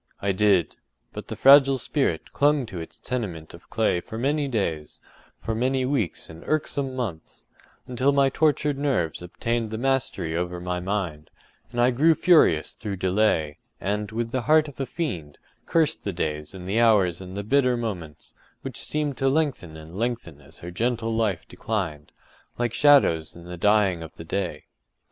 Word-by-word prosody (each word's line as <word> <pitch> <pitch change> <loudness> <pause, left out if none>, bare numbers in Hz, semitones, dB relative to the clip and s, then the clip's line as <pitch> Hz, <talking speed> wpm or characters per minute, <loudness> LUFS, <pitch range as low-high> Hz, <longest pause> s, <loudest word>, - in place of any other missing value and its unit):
I 100 - 0
did; 95 -4 +2 0.4
but - - -7
the - - -5
fragile 135 0 +7
spirit 125 - -1
clung 145 -2 +2
to 95 -6 -7
its 80 - -9
tenement 95 -11 -5
of 85 - -15
clay 110 -6 +1
for 110 +3 -8
many 145 +4 0
days—for 95 - -5
many 130 +3 0
weeks 125 - -1
and 80 0 -12
irksome 140 -3 -1
months, 105 -11 -6 0.4
until 130 +3 +1
my 140 -1 +3
tortured 150 -1 +1
nerves 110 - 0
obtained 115 +6 -2
the 110 - -4
mastery 120 -10 -1
over 90 +1 -2
my 90 0 -3
mind, 90 -5 -3 0.4
and 120 - -4
I 120 +1 +4
grew 155 +6 +4
furious 155 - +4
through 105 -3 -5
delay, 90 -5 +1 0.2
and, 105 +2 -2
with 115 +1 -3
the 130 - -1
heart 155 0 +5
of 140 -3 -12
a 135 - -2
fiend, 90 - -4 0.3
cursed 160 -2 +1
the 100 - -3
days 75 0 -3
and 90 -1 -8
the 105 +4 +1
hours 100 -7 +3
and 95 +1 -8
the 100 - -3
bitter 125 +2 +2
moments, 90 -10 -6 0.3
which - - -6
seemed 150 -3 -2
to 135 - +2
lengthen 135 - -1
and 80 +2 -12
lengthen 110 - -3
as 70 - -13
her 90 - -6
gentle 115 +3 -1
life 105 -6 -1
declined—like 105 +5 -5
shadows 115 - +4
in 85 - -12
the 90 0 -7
dying 100 -1 +2
of 80 -1 -9
the 80 - -10
day. 95 +2 -3
110 Hz, 170 wpm, -25 LUFS, 85-135 Hz, 0.4 s, fragile